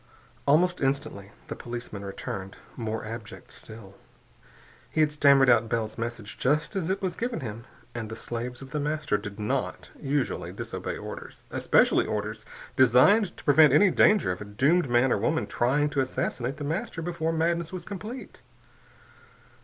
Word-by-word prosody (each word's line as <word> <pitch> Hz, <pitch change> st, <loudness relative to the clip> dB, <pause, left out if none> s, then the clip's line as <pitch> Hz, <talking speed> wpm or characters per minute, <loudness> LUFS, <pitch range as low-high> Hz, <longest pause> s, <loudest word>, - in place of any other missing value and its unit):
Almost 175 Hz, +5 st, +3 dB
instantly 135 Hz, -8 st, -2 dB
the -, -, -6 dB
policeman 120 Hz, -4 st, -7 dB
returned, 95 Hz, 0 st, -6 dB, 0.2 s
more 110 Hz, -2 st, -4 dB
abject 115 Hz, -1 st, -8 dB
still. 110 Hz, -3 st, -12 dB, 1.0 s
He -, -, -3 dB
had 150 Hz, -1 st, +3 dB
stammered 140 Hz, -2 st, +5 dB
out 115 Hz, -2 st, +4 dB
Bell's 110 Hz, -2 st, -1 dB
message, 115 Hz, -2 st, -6 dB
just 150 Hz, +9 st, +1 dB
as 185 Hz, -3 st, -1 dB
it 195 Hz, +1 st, -1 dB
was 180 Hz, -3 st, -1 dB
given 240 Hz, 0 st, -3 dB
him. 115 Hz, -1 st, -6 dB, 0.3 s
And 115 Hz, -3 st, -5 dB
the 110 Hz, -, -6 dB
slaves 120 Hz, +3 st, -5 dB
of 135 Hz, -, -12 dB
The 150 Hz, -, -2 dB
Master 150 Hz, -4 st, -1 dB
did 105 Hz, 0 st, -8 dB
not 105 Hz, -, -2 dB
usually 140 Hz, -1 st, -1 dB
disobey -, -, -5 dB
orders, -, -, -9 dB
especially -, -, +3 dB
orders 110 Hz, +1 st, -4 dB, 0.3 s
designed 130 Hz, -, +5 dB
to -, -, -12 dB
prevent 150 Hz, -1 st, +6 dB
any 185 Hz, +6 st, +6 dB
danger 210 Hz, -, +4 dB
of 90 Hz, -, -5 dB
a -, -, -5 dB
doomed 140 Hz, +10 st, +2 dB
man 120 Hz, +2 st, +3 dB
or -, -, +2 dB
woman 160 Hz, +9 st, 0 dB
trying 140 Hz, +5 st, +1 dB
to 140 Hz, -, +1 dB
assassinate 130 Hz, 0 st, -2 dB
The 145 Hz, -, -6 dB
Master 165 Hz, +2 st, -3 dB
before 165 Hz, -1 st, -1 dB
madness 165 Hz, 0 st, 0 dB
was 180 Hz, -2 st, -6 dB
complete. 215 Hz, +6 st, -8 dB
135 Hz, 160 wpm, -27 LUFS, 115-160 Hz, 1.0 s, prevent